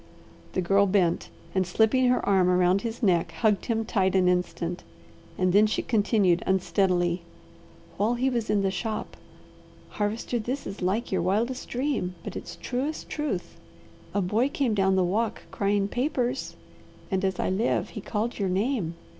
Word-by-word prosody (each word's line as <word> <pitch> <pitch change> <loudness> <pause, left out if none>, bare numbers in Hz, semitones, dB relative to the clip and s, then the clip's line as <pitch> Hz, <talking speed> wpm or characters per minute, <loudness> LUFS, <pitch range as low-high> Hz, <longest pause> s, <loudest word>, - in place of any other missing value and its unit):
The 185 - 0
Girl 200 +3 +4
bent 185 -3 +1 0.2
and 185 -2 +1
slipping 220 +7 +3
her 250 - +1
arm 190 -2 +4
around 180 +1 +3
his 230 +2 -5
neck 170 -4 +2
hugged 210 +4 +1
him 225 -2 0
tight 190 -4 +1
an 185 -1 +4
instant, 180 -1 -1 0.5
and 185 -1 +2
then 210 +2 +6
she 215 - -1
continued 205 -5 +2
unsteadily: 185 -2 +1 0.8
"While 220 +4 +2
he 250 +2 0
was 235 -4 -1
in 205 -1 +2
the 195 - +1
shop 215 +3 -4 0.7
Harvester, 220 +3 -2
this 255 +5 -3
is 195 - -7
like 195 +6 -1
your 190 -2 +1
wildest 225 +9 -1
dream, 245 -9 -1
but - - -6
it's - - -7
truest 275 +5 -3
truth 300 -1 -3 0.5
a 205 - 0
boy 220 +9 +1
came 270 -5 0
down 190 -2 +2
the 190 - +3
walk 215 +5 -1
crying 200 0 +1
papers, 250 +1 -1 0.6
and 190 0 0
as 190 -1 0
I - - 0
live, 210 +6 0
he 210 - -7
called 225 +4 -3
your 195 -2 0
name. 195 -3 0
200 Hz, 165 wpm, -26 LUFS, 185-235 Hz, 0.8 s, then